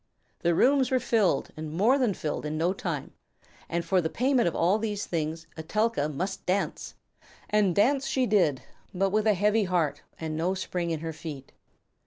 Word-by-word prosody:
The 170 -1 +1
rooms 270 +5 +4
were 260 - +2
filled 220 -6 +1
and 155 -1 -6
more 220 - +3
than 235 -7 +1
filled 150 - -3
in 150 +1 -3
no 170 +4 +1
time, 165 -7 -4 0.6
and 170 0 -2
for 185 +1 +2
the 160 - -1
payment 255 -1 +2
of 170 - -1
all 185 +6 +2
these 210 -2 -2
things 160 0 -3
Etelka 185 0 0
must 185 +7 -4
dance! 190 +2 -1 0.6
And 205 -4 +3
dance 270 +6 +3
she 260 -1 +1
did, 170 - +2 0.3
but 195 +1 +1
with 215 +1 +1
a 210 - +4
heavy 210 +2 +2
heart 175 -5 0 0.2
and 160 -1 -3
no 175 +4 0
spring 180 -2 -3
in 160 -2 -2
her 165 0 -4
feet. 150 -4 -8
185 Hz, 185 wpm, -27 LUFS, 160-215 Hz, 0.6 s, rooms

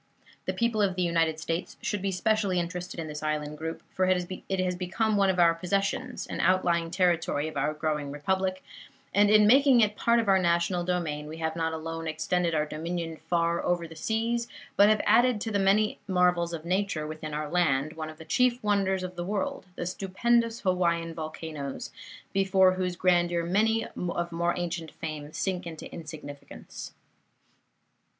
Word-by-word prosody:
The - - 0
people 235 -2 +1
of 195 -3 +2
the 185 - 0
United 165 -2 +1
States 165 +2 -3
should 205 -4 -2
be 195 0 -1
specially 200 -1 +1
interested 180 +1 -4
in 165 - -3
this 150 -1 -6
island 150 -1 -2
group, 160 +1 -5
for 185 - +2
it 185 +1 -1
has 180 -1 0
become 210 +5 0
one 200 -1 +3
of 185 - +1
our 170 -1 +6
possessions, 200 +9 -2
an - - -6
outlying 175 -3 +2
Territory 170 -4 +1
of 155 - -7
our 150 +2 0
growing 150 -2 -2
Republic, 185 +6 -1 0.5
and 205 +1 +5
in 210 0 +6
making 265 +2 +6
it 210 -2 +3
part 235 +2 +3
of 225 - -1
our 190 -1 +5
national 170 0 +1
domain 165 -4 -2
we 155 +1 -7
have 160 0 -2
not 165 -1 -1
alone 165 0 -5
extended 165 +2 0
our 150 0 +2
dominion 165 +2 -4
far 170 +1 0
over 175 -1 0
the 165 - -12
seas, 230 +6 -1 0.3
but 205 +1 +6
have 215 -1 +3
added 240 -1 +4
to 225 - -3
the 200 - +1
many 200 +2 +2
marvels 180 -2 +2
of 165 -1 -6
nature 185 -3 0
within 155 0 -6
our 150 0 -2
land 155 -3 +1
one 155 -1 -5
of 155 - -11
the 160 - -11
chief 245 +9 +2
wonders 195 -2 +1
of 185 0 -6
the 175 - -3
world, 210 +5 -3
the - - -4
stupendous 230 +6 0
Hawaiian 170 -3 +1
volcanoes, 155 -3 -6 0.4
before 190 -1 +4
whose 185 -1 -2
grandeur 175 -1 +2
many 220 +5 +2
of 175 -1 -3
more 170 +1 0
ancient 170 -2 -3
fame 155 -2 -6
sink 185 +1 -2
into 160 -2 -8
insignificance. 150 -3 -9
175 Hz, 180 wpm, -28 LUFS, 160-195 Hz, 0.5 s, our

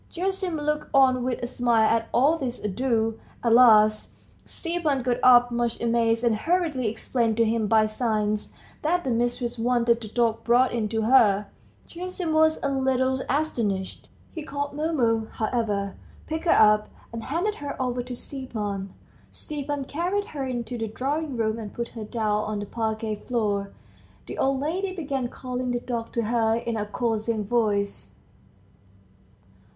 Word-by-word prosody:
Gerasim 375 -1 -2
looked 300 0 -2
on 260 -2 +5
with 250 -1 -2
a - - +1
smile 240 -2 +2
at 230 0 +1
all 280 +6 +4
this 255 -6 -4
ado; 225 +1 0 0.2
at 230 -2 +3
last, 215 -3 +5 0.3
Stepan 330 -6 -2
got 245 -1 +1
up, 245 -1 +6
much 235 -1 -1
amazed, 230 0 +1
and 235 -2 +3
hurriedly 315 -2 0
explained 225 +1 -1
to 230 - +4
him 220 -1 0
by 220 0 +4
signs 215 -1 -1 0.3
that 350 +3 +1
the 260 - -1
mistress 240 0 -1
wanted 235 0 +2
the 220 - -6
dog 230 0 0
brought 245 +2 +4
in 220 -3 -1
to 225 0 -1
her. 215 -4 +4 0.4
Gerasim 360 -1 -4
was 315 0 +4
a 280 - +1
little 260 -1 +1
astonished; 230 -10 -2 0.2
he 320 - -5
called 285 -1 -4
Mumu, 255 -8 0
however, 215 -3 -1 0.3
picked 320 +2 -4
her 340 - +4
up, 210 -1 +5 0.2
and 230 -1 -5
handed 345 +10 -1
her 285 -1 -5
over 250 -1 -1
to 245 0 -6
Stepan. 210 -8 -5 0.4
Stepan 290 -2 -5
carried 360 +8 -1
her 285 -3 -4
into 245 -2 -4
the 225 - -2
drawing 275 +5 -3
room, 220 0 0
and 210 -3 -8
put 235 0 -3
her 225 -2 -7
down 210 -2 -1
on 215 0 -3
the 205 - -4
parquette 220 -1 -3
floor. 205 -5 0 0.6
The - - -7
old 270 0 +1
lady 370 +6 -2
began 275 -7 -2
calling 250 0 -4
the 245 0 0
dog 235 -2 -4
to 235 - 0
her 225 0 +2
in 235 0 -3
a 210 -1 -2
coaxing 220 -1 -1
voice. 205 -3 -1
240 Hz, 160 wpm, -25 LUFS, 220-275 Hz, 0.6 s, up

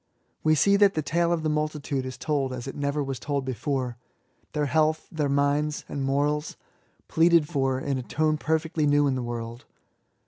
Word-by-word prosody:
We 155 0 +4
see 200 +7 +4
that 200 -1 +4
the 155 - 0
tale 170 +3 +1
of 165 -2 0
the - - +1
multitude 150 -3 -2
is 130 0 -7
told 135 -2 -1
as 125 -1 -6
it 135 - -5
never 145 +1 -1
was 135 -2 -4
told 140 -2 -2
before 130 -1 -2 0.3
— 130 - -41
^their 150 -1 +1
health, 155 +2 +1
their 150 -4 -1
minds 145 +2 +1
and 140 - -4
morals, 145 +2 0 0.5
pleaded 165 -1 +4
for 135 -4 0
in 135 -1 -2
a - - -3
tone 155 +4 0
perfectly 160 0 0
new 145 0 +4
in 140 - +2
the 130 - -2
world. 120 0 -5
145 Hz, 195 wpm, -26 LUFS, 135-155 Hz, 0.5 s, We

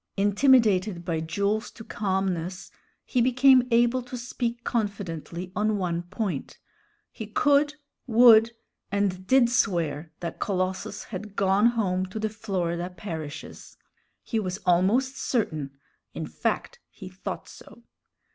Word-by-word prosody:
Intimidated 205 -4 +3
by 165 -3 -1
Jules 200 +7 -1
to 225 - -12
calmness, 190 -4 -2 0.3
he 250 - +1
became 255 +1 +5
able 240 +2 +3
to 250 +1 -7
speak 240 0 -4
confidently 185 - -3
on 210 +1 +1
one 175 -3 -1
point; 180 -4 -4 0.5
he 220 - -7
could, 290 +6 +2 0.3
would, 230 -1 +7 0.4
and 190 -2 -1
did 260 0 +5
swear 170 -9 0
that 170 - -6
Colossus 185 -1 -2
had 205 0 -8
gone 195 +3 +3
home 190 -6 0
to 185 - -8
the 215 0 -1
Florida 180 -5 -3
parishes; 165 -5 -8 0.5
he 225 - -1
was 185 -3 -3
almost 200 +10 +2
certain; 155 - -1 0.5
in - - -4
fact, - - -3
he - - -11
thought - - -7
so. - - -15
200 Hz, 125 wpm, -26 LUFS, 180-235 Hz, 0.5 s, would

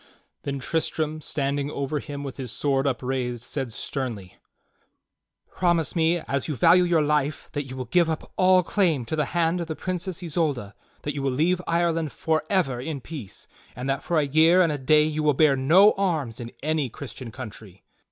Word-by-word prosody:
Then 140 -1 -3
Tristram 155 +2 -1
standing 140 -1 -1
over 140 +1 -2
him 145 -1 -7
with 135 -3 -6
his 130 -4 -5
sword 135 +2 0
upraised 125 -2 -2
said 130 -2 -4
sternly: 110 -7 -5 1.2
"Promise 175 -3 +1
me, 165 +1 +3
as 140 -2 -2
you 150 - -2
value 170 +7 +5
your 170 -3 +3
life, 150 0 0
that 145 -2 -3
you 130 -1 -8
will 130 - -4
give 170 +7 +2
up 160 - -4
all 185 0 +5
claim 165 - +1
to 155 - -2
the 150 -2 +1
hand 170 +1 +2
of 170 - -4
the 160 - -4
Princess 185 0 -4
Isolda; 145 - -1 0.3
that 145 - -2
you 140 - -4
will 135 - 0
leave 165 +8 +1
Ireland 165 -2 +1
forever 160 -4 0
in 145 +1 -4
peace; 130 - -8 0.3
and 125 +3 -5
that 135 +1 -2
for 170 - -1
a 150 - +3
year 160 +6 +5
and 165 - +1
a 145 - -3
day 150 +3 +4
you 155 0 -1
will 150 -2 +3
bear 150 -1 +5
no 170 +11 +6
arms 160 - -1
in 120 -1 -7
any 155 -3 0
Christian 130 0 -8
country." 110 -5 -10
150 Hz, 190 wpm, -25 LUFS, 135-165 Hz, 1.2 s, no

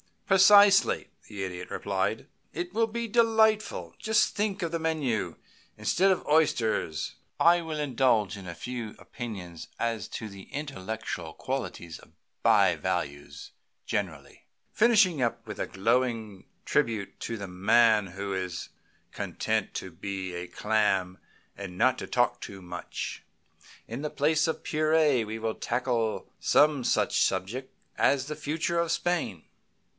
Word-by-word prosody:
"Precisely," 200 +1 +6 0.2
the 100 -3 -5
Idiot 90 -1 -6
replied. 100 +2 -2 0.3
"It 175 +3 -4
will 225 +1 +2
be 235 +1 -3
delightful. 220 -2 +2
Just 220 0 +2
think 205 -1 -1
of 165 - -2
the 165 - -1
menu! 155 -9 -1 0.4
Instead 190 +2 +2
of 190 - +1
oysters 115 - +1 0.2
I 175 +1 +5
will 160 -2 -4
indulge 125 -8 +2
in 95 -2 -9
a 85 - -6
few 120 -1 -6
opinions 95 -8 -8
as 115 -4 -2
to 110 - -6
the 100 -1 -11
intellectual 110 - -5
qualities 120 -11 -5
of - - -19 0.3
bivalves 70 0 +1 0.3
generally, 80 -9 -4 0.3
finishing 210 - +4
up 120 -2 -1
with - - -7
a - - -1
glowing 110 -1 -1 0.2
tribute 110 -4 0
to 115 - -4
the 100 -2 -6
man 105 +3 +4
who 100 +2 -5
is 95 -2 -4 0.4
content 110 -2 -2
to 95 - -5
be 95 +1 -5
a 90 0 -5
clam 95 -2 0 0.4
and 95 -3 -7
not 130 +5 +3
talk 120 -1 +2
too 95 -1 -8
much. 90 -1 -6 0.6
In 120 +5 -6
the 150 - -2
place 155 +3 +2
of 160 - -3
purée 155 -5 +2
we 110 +1 -4
will 110 0 -2
tackle 120 -3 -1
some 145 -4 +3
such - - +2
subject 100 +8 -1 0.3
as 140 -2 +3
the 150 +1 -5
future 160 +3 -1
of 170 -1 0
Spain. 170 - -1
115 Hz, 135 wpm, -28 LUFS, 95-160 Hz, 0.6 s, Precisely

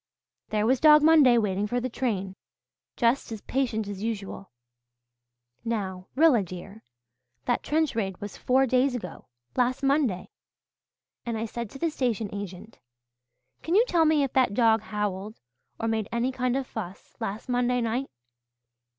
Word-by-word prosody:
There 215 0 +1
was 255 +2 +3
Dog 300 0 +7
Monday, 300 -6 +6
waiting 205 -2 0
for 245 +3 -1
the 250 - -2
train, 205 -7 -2 0.6
just 235 +1 +1
as 220 -2 -6
patient 235 -5 -1
as 200 -1 -6
usual. 205 -3 -5 1.1
Now, 190 -5 -3
Rilla, 290 -6 +5
dear, 190 +3 -9 0.6
that 245 - +1
trench 310 -4 0
raid 195 -5 -2
was 205 0 -7
four 265 +1 +2
days 255 +1 +2
ago 180 -8 -7 0.3
last 255 +2 +1
Monday 270 -9 +1 0.9
and 235 -2 -3
I 220 - -2
said 235 0 -5
to 270 - -10
the 330 +3 -1
station 230 -7 -2
agent, 200 +1 -8 0.8
'Can 335 - -1
you 450 +4 +6
tell 335 -6 +3
me 310 -2 +3
if 270 - -2
that 255 -6 +2
dog 225 -2 +4
howled 210 -1 -4 0.4
or 225 - -1
made 220 -2 -1
any 235 +2 0
kind 255 -1 -1
of - - 0
a - - -28
fuss 195 -4 -7
last 200 +3 -4
Monday 250 0 +1
night?' 240 +3 -1
230 Hz, 160 wpm, -27 LUFS, 205-260 Hz, 1.1 s, Dog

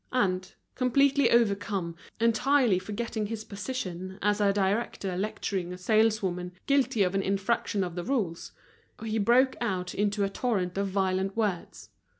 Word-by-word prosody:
And, 185 -7 0 0.2
completely 275 +1 +3
overcome, 200 -6 +1 0.2
entirely 230 -1 +3
forgetting 215 +2 -3
his 220 0 -5
position 190 -4 -5
as 210 +1 +1
a 200 -1 +4
director 195 -1 -1
lecturing 190 -2 -3
a 180 - -6
saleswoman 190 -3 +1
guilty 265 -6 +2
of 180 0 0
an 195 - +1
infraction 195 +1 0
of 175 -2 -4
the 175 0 -4
rules, 205 -10 -2 0.5
he 220 0 -1
broke 250 +5 +4
out 185 -5 -2
into 205 0 0
a - - +2
torrent 195 -5 -1
of 200 0 0
violent 190 +1 -1
words. 205 -6 -2
200 Hz, 145 wpm, -28 LUFS, 185-230 Hz, 0.5 s, a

